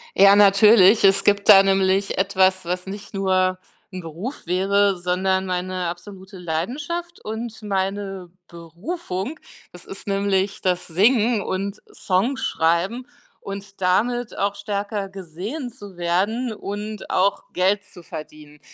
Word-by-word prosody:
Ja, 200 +1 +7
natürlich. 205 +1 +6
Es 195 0 +4
gibt 200 0 +2
da 195 0 +10
nämlich 195 0 +1
etwas, 190 -1 +2
was 180 +1 -3
nicht 200 +1 -8
nur 185 -1 +1 0.3
'n 185 -1 -6
Beruf 175 - -7
wäre, 195 +2 +2
sondern 190 +1 0
meine 180 0 -2
absolute 190 +2 -9
Leidenschaft 280 - -4
und 220 +1 -5
meine 195 -2 -3 0.2
Berufung. 190 - -6 0.3
Das 180 - -13
ist 195 - -10
nämlich 195 -1 0
das 180 -1 0
Singen 220 +5 +3
und 195 +2 -4
Songschreiben 195 0 0 0.3
und 195 0 -9
damit 235 +6 0
auch 200 0 0
stärker 200 -1 -4
gesehen 195 - -6
zu 205 -7 -13
werden 200 +8 0
und 210 0 -6
auch 195 +2 +1
Geld 195 +3 +1
zu 175 - -15
verdienen. 150 -1 -10
195 Hz, 125 wpm, -22 LUFS, 185-205 Hz, 0.3 s, da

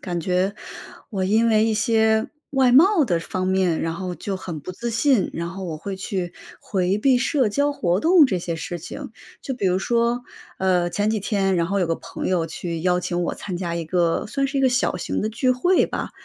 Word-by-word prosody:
感 175 -2 -3
觉， 185 +3 0 0.6
我 190 -3 -1
因 220 +4 +3
为 215 0 +4
一 225 - +1
些 220 0 +2 0.2
外 265 -3 +3
貌 330 +4 +6
的 175 -7 +1
方 185 +2 -3
面， 185 -3 +1
然 165 - -1
后 180 +1 -4
就 195 +1 -4
很 170 -4 -6
不 145 - -7
自 235 +5 -4
信， 240 -1 +2
然 170 0 -4
后 190 +2 -7
我 160 -3 -4
会 190 +5 -6
去 190 -2 -4 0.3
回 190 -1 0
避 255 +3 +3
社 265 -2 +1
交 285 +7 +1
活 180 -9 0
动 335 +2 +6
这 190 -8 -1
些 170 -1 -3
事 175 +1 -5
情。 170 - -8 0.3
就 270 - -4
比 225 -6 -1
如 185 0 +2
说， 235 +3 0 0.4
呃， 180 -2 +2
前 205 +4 0
几 220 - 0
天， 195 -2 0
然 170 -1 +1
后 200 +2 0
有 180 - +1
个 165 - 0
朋 - - -6
友 175 -3 +1
去 165 0 -5
邀 180 0 +2
请 175 0 -2
我 - - -2
参 185 -3 -5
加 175 -1 -3
一 170 -1 -3
个 170 +2 0
算 275 +6 -1
是 275 0 -2
一 - - +2
个 265 - +4
小 250 -6 +1
型 - - -3
的 215 - 0
聚 240 +4 0
会 350 +9 +3
吧， - - -4
195 Hz, 245 characters per minute, -22 LUFS, 175-235 Hz, 0.6 s, 貌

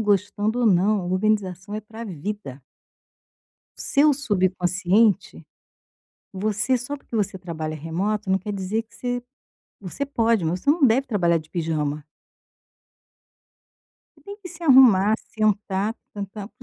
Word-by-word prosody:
gostando 210 +2 0
ou 235 - +3
não, 190 -1 +2
organização 200 -1 -1
é 215 - -3
para 220 +2 -9
vida. 175 - -6 1.2
O - - -11
seu 295 +1 +3
subconsciente, 190 -3 +1 0.8
você 215 +6 0
só 270 +4 -5
porque 235 - -7
você 200 -2 -1
trabalha 160 -3 -5
remoto 190 +7 -2
não 190 - +4
quer 210 0 -5
dizer 200 +3 -2
que 225 - -25
você 245 0 -3 0.6
você 200 +9 -4
pode, 230 -7 +1
mas 175 +3 -1
você 285 - +2
não 305 -3 +4
deve 260 +4 +2
trabalhar 175 -7 +2
de 155 0 -14
pijama. 155 -3 -2 2.1
Você - - -22
tem 405 0 -9
que 395 -4 -10
se 340 0 -12
arrumar, 235 - +6
sentar, 210 -1 -1 0.2
tan-tan, 200 0 -6
para 245 - -20
205 Hz, 135 wpm, -23 LUFS, 185-230 Hz, 2.1 s, arrumar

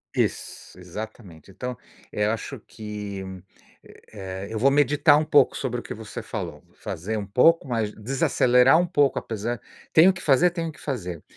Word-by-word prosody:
Isso, - - -3
exatamente. 95 -2 -9
Então 125 +5 -6 0.3
eu 105 0 0
acho 115 - -5
que, 105 -2 -7 0.9
eh, 95 -1 -7
eu 110 - -4
vou 135 +5 +4
meditar 145 +1 +4
um 155 - 0
pouco 145 - +4
sobre 125 -2 -3
o - - -10
que - - -6
você 110 -1 -8
falou, - - -6
vou - - -30
fazer 105 +7 -4
um 105 - -4
pouco, 140 +9 +4
mas 110 -4 -1
desacelerar 125 +3 +3
um 175 - +1
pouco, 145 -6 +2
apesar 115 +1 -4 0.3
tenho 165 +4 +7
o - - -6
que 180 - -9
fazer, 145 +3 +4
tenho 165 -1 -3
o - - -6
que - - -18
fazer, 90 - -5
115 Hz, 180 wpm, -24 LUFS, 105-140 Hz, 0.9 s, tenho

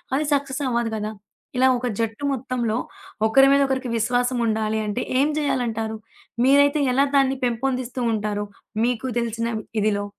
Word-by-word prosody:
అది 295 +2 0
సక్సెసవ్వదు 265 -5 -1
కదా! 215 0 -4 0.4
ఇలా 260 - +5
ఒక 250 0 -2
జట్టు 225 +4 -3
మొత్తంలో, 250 -4 -1 0.5
ఒకరి 270 +5 +6
మీద 280 0 +5
ఒకరికి 265 -2 -2
విశ్వాసం 245 +2 +1
ఉండాలి 220 -1 0
అంటే, 210 +4 -2 0.2
ఏం 280 - +4
జేయాలంటారు? 235 -6 -1 0.5
మీరైతే 285 +2 +5
ఎలా 275 +2 +4
దాన్ని 270 -1 +3
పెంపొందిస్తూ 250 +1 -2
ఉంటారు, 210 -1 -2 0.4
మీకు 245 +1 -1
తెలిసిన 230 0 -2 0.3
ఇదిలో. 205 -1 +1
245 Hz, 135 wpm, -23 LUFS, 220-270 Hz, 0.5 s, ఒకరి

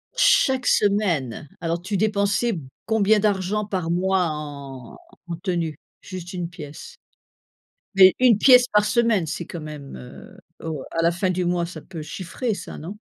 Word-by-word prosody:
Chaque 265 - +3
semaine! 175 - +1
Alors 170 +1 -2
tu 200 +3 -3
dépensais 205 +2 +1
b 155 -7 -6 0.2
combien 220 -1 +3
d'argent 205 0 0
par 185 -5 -2
mois 185 0 +1
en 140 -5 -8 0.3
en 170 - -4
tenue 170 -4 -1 0.3
juste 185 -2 -8
1 175 -2 -4
pièce? 150 -4 -10 1.0
Mais 190 -1 +8
1 245 -5 +5
pièce 250 +1 +7
par 210 -2 +3
semaine 230 -6 +2
c'est 165 +1 -4
quand 170 - -7
même, 150 - -8
heu, 65 -1 -12 0.3
o 155 -4 -4
à 165 - 0
la 170 - +3
fin 185 +2 -1
du 180 0 -1
mois 175 -1 0
ça 180 - -9
peut 165 -4 -9
chiffrer 190 - -4
ça - - -8
non? 180 +7 -8
180 Hz, 165 wpm, -23 LUFS, 165-210 Hz, 1.0 s, Mais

